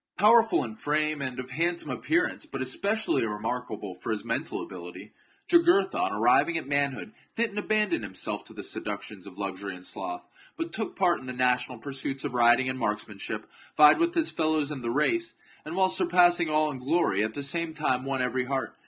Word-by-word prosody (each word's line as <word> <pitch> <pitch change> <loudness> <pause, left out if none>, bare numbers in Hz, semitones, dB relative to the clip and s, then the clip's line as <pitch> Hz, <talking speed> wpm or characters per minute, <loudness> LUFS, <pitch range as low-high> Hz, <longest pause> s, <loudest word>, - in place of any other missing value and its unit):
CHAP. 210 - +1
Powerful 225 0 +5
in 115 - -6
frame, 150 +4 0
and 130 -2 -4
of 130 +1 -7
handsome 170 +5 -1
appearance, 350 +3 0
but 135 - -6
especially 200 - 0
remarkable 110 -2 -4
for 110 - -3
mental - - -3
ability, 90 +3 -10 0.3
Jugurtha, 350 +2 +4
on 365 +1 0
arriving 170 -1 +3
at 160 - -4
manhood, 140 - -1 0.2
did 230 -2 0
not 210 0 -3
abandon 210 - +1
himself 95 -3 -4
to - - -13
the - - -7
seductions 100 -3 -6
of 95 - -12
luxury 95 -1 -5
and 90 0 -11
sloth, 355 - -6 0.3
but 330 0 -4
took 220 - -3
part 180 -3 +2
in 130 - -11
the 125 - -3
national 125 0 +1
pursuits 135 +1 -5
of - - -3
riding 120 +1 +4
and 130 0 -2
marksmanship, 105 -2 -3 0.3
vied 150 - +8
with 340 +1 +1
his 325 -2 +2
fellows 155 -2 0
in 140 -3 -5
the 120 - -3
race, 335 - 0 0.3
and, 155 +3 -6
while 190 0 +4
surpassing 175 -2 +4
all 155 0 +2
in 130 - -7
glory, 130 - +1
at 110 0 -3
the 145 - -3
same 165 +4 0
time 140 -5 -1
won 135 -1 -1
every 125 0 -1
heart. 130 -3 -3
140 Hz, 195 wpm, -27 LUFS, 125-180 Hz, 0.3 s, vied